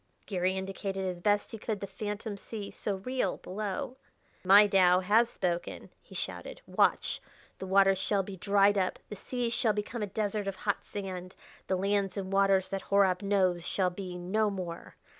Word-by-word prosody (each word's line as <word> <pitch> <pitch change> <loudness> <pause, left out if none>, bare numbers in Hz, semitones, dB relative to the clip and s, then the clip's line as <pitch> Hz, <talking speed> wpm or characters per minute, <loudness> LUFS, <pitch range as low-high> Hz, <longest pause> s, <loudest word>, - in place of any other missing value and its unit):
Garry 185 -1 0
indicated 195 0 -3
as 180 -2 -3
best 205 +3 +1
he 225 - -7
could 215 -1 -3
the 200 - -4
phantom 205 +2 -5
sea, 205 0 -7
so 205 - -3
real, 200 0 -2
below. 215 +7 -4 0.5
"My 200 +3 +8
Tao 185 -2 +5
has 220 +5 +4
spoken," 175 -5 -3
he - - -15
shouted: - - -5
"watch! - - +1 0.4
The 190 - -5
waters 195 0 +4
shall 200 -1 +1
be 195 0 -7
dried 200 +1 +3
up; 185 - 0
the 210 - -5
seas 240 +3 -3
shall 230 -3 +2
become 210 +3 -4
a 210 - -1
desert 205 0 -2
of 195 - -2
hot 205 +1 -2
sand; 185 -2 -6 0.3
the 190 - +1
lands 200 +1 0
and 195 -1 -4
waters 195 -1 +3
that 195 0 -3
Horab 190 -2 +4
knows 190 -4 +2
shall 185 +1 0
be 180 -1 -6
no 210 +5 +1
more! 180 -4 -6
195 Hz, 180 wpm, -30 LUFS, 185-205 Hz, 0.5 s, My